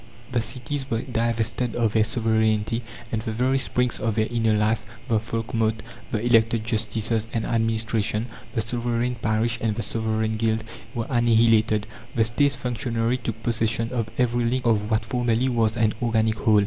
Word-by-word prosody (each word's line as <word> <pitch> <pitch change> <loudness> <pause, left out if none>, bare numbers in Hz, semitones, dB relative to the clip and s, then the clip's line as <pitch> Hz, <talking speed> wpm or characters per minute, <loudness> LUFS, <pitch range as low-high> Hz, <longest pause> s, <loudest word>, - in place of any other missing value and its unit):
The 120 -2 +1
cities 130 +4 -3
were 115 +2 -1
divested 115 -1 -1
of 115 -3 +1
their 110 - +4
sovereignty, 110 0 +1 0.3
and 110 - -1
the 110 - -3
very 130 +4 +1
springs 125 -2 0
of 110 -1 -1
their 110 -1 +2
inner 115 -2 +2
life 105 +1 +1 0.2
the 115 -4 +2
folkmote, 115 0 -1 0.3
the 110 +1 -1
elected 115 -1 +3
justices 110 0 0
and 115 - -1
administration, 110 -1 0 0.3
the 115 - +2
sovereign 120 +2 -1
parish 115 0 0
and 110 -2 0
the 115 - -2
sovereign 110 +1 -1
guild 110 0 +1 0.3
were 115 -1 -1
annihilated; 115 -3 +3 0.3
the 115 - +4
State's 135 +5 +2
functionary 120 -1 -1
took 115 -2 -5
possession 115 0 0
of 115 -3 -1
every 120 -1 +2
link 125 +2 0
of 105 -2 +2
what 110 0 +1
formerly 120 -1 +1
was 115 -2 +1
an 110 -2 +2
organic 110 -2 +2
whole. 110 -2 +4
115 Hz, 165 wpm, -24 LUFS, 110-120 Hz, 0.3 s, their